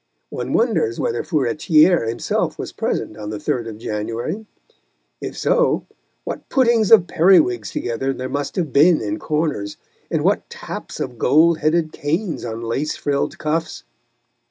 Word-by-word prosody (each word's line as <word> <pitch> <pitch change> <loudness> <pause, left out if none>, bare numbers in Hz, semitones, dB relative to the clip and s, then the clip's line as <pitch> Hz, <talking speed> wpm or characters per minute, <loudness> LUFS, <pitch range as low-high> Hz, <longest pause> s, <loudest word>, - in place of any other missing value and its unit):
One - - -4
wonders 450 -4 +1
whether 450 -2 -1
Furetière 155 - +3
himself 115 - -1
was - - -5
present - - -3
on 105 -1 -6
the 105 - -4
3rd 120 -1 -2
of 105 - -8
January; 115 - -4 0.7
if - - -6
so, - - +2 0.4
what - - -6
puttings 235 -5 +3
of 210 -6 +7
periwigs 160 - +3
together 125 +3 -2
there 130 -1 -4
must 140 +2 -3
have 165 -7 -2
been 155 +3 +5
in 315 +1 -3
corners, 150 - -2 0.3
and - - 0
what - - +1
taps - - -7
of 125 -2 -5
gold 160 +5 +4
headed 155 0 +1
canes 165 +5 -2
on 115 0 -5
lace 135 +7 -2
frilled 140 -1 -1
cuffs! 160 +2 -2
150 Hz, 150 wpm, -20 LUFS, 120-175 Hz, 0.7 s, of